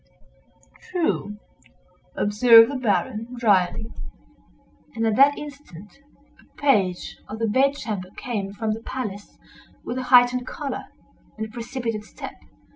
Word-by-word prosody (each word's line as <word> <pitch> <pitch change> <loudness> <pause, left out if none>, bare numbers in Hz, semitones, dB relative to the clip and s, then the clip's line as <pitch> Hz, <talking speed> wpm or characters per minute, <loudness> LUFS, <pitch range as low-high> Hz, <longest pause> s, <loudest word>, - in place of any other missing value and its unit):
"True!" 315 - -1 0.8
observed 225 +3 +6
the - - -4
Baron, 235 0 -1
dryly, 210 -1 +1 1.0
and 225 0 -1
at 220 -1 +2
that 280 +2 +6
instant 275 - -11 0.4
a - - -29
page 200 -11 +1
of 215 - -7
the 225 - -1
bedchamber 220 -6 0
came 205 -6 -4
from 215 +2 -2
the 225 - -7
palace 210 -6 -6 0.5
with 245 +2 -4
a - - -3
heightened 250 0 +5
color, 285 -2 -5 0.5
and 220 - -3
a 220 - -11
precipitate 235 -2 -4
step. - - -9
230 Hz, 120 wpm, -23 LUFS, 210-255 Hz, 1.0 s, observed